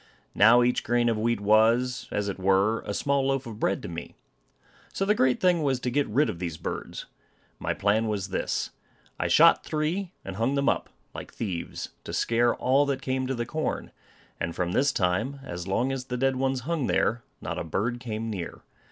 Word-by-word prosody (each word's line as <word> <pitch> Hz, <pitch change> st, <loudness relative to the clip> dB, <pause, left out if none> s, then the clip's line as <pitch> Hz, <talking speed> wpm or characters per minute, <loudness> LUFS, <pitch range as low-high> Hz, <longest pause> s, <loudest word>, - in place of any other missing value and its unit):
Now 115 Hz, +4 st, +6 dB
each 125 Hz, +1 st, +1 dB
grain 120 Hz, 0 st, +2 dB
of 115 Hz, -, 0 dB
wheat 115 Hz, +1 st, +1 dB
was, 115 Hz, +5 st, +3 dB
as 105 Hz, 0 st, -2 dB
it 100 Hz, -1 st, -4 dB
were, 95 Hz, +4 st, +3 dB
a -, -, -2 dB
small 140 Hz, +5 st, +1 dB
loaf 135 Hz, -1 st, 0 dB
of 110 Hz, -2 st, -8 dB
bread 95 Hz, -, 0 dB
to -, -, -4 dB
me. 85 Hz, 0 st, -7 dB, 0.8 s
So 195 Hz, -, -1 dB
the 210 Hz, -, +4 dB
great 130 Hz, -10 st, +2 dB
thing 180 Hz, -3 st, +3 dB
was 135 Hz, -4 st, +1 dB
to 125 Hz, -, -1 dB
get 145 Hz, +3 st, +1 dB
rid 140 Hz, +8 st, +2 dB
of 85 Hz, -, -4 dB
these 85 Hz, -3 st, -4 dB
birds. -, -, -5 dB, 0.5 s
My -, -, -2 dB
plan 105 Hz, +3 st, +2 dB
was 100 Hz, -3 st, -2 dB
this, -, -, -2 dB, 0.5 s
I -, -, +1 dB
shot -, -, +6 dB
three, 165 Hz, +5 st, -2 dB
and 95 Hz, 0 st, -6 dB
hung 120 Hz, +5 st, +1 dB
them 140 Hz, 0 st, +1 dB
up, -, -, +1 dB, 0.2 s
like -, -, -8 dB
thieves, 90 Hz, -7 st, -4 dB
to -, -, -7 dB
scare 120 Hz, +1 st, +2 dB
all 140 Hz, +3 st, +2 dB
that 140 Hz, -1 st, -2 dB
came 130 Hz, 0 st, -1 dB
to 135 Hz, -, -1 dB
the 120 Hz, 0 st, -2 dB
corn; 155 Hz, +6 st, -3 dB, 0.5 s
and 85 Hz, 0 st, -3 dB
from 90 Hz, -1 st, -1 dB
this 135 Hz, +8 st, +3 dB
time, 105 Hz, +8 st, 0 dB
as 90 Hz, -6 st, -6 dB
long 120 Hz, +7 st, +1 dB
as 135 Hz, -1 st, -4 dB
the 125 Hz, -1 st, -3 dB
dead 135 Hz, +1 st, +1 dB
ones 130 Hz, 0 st, 0 dB
hung 150 Hz, 0 st, -1 dB
there, 120 Hz, +2 st, +1 dB, 0.2 s
not -, -, -4 dB
a -, -, -2 dB
bird 110 Hz, +9 st, -2 dB
came 115 Hz, -2 st, -4 dB
near. 90 Hz, -5 st, -6 dB
120 Hz, 205 wpm, -27 LUFS, 100-135 Hz, 0.8 s, Now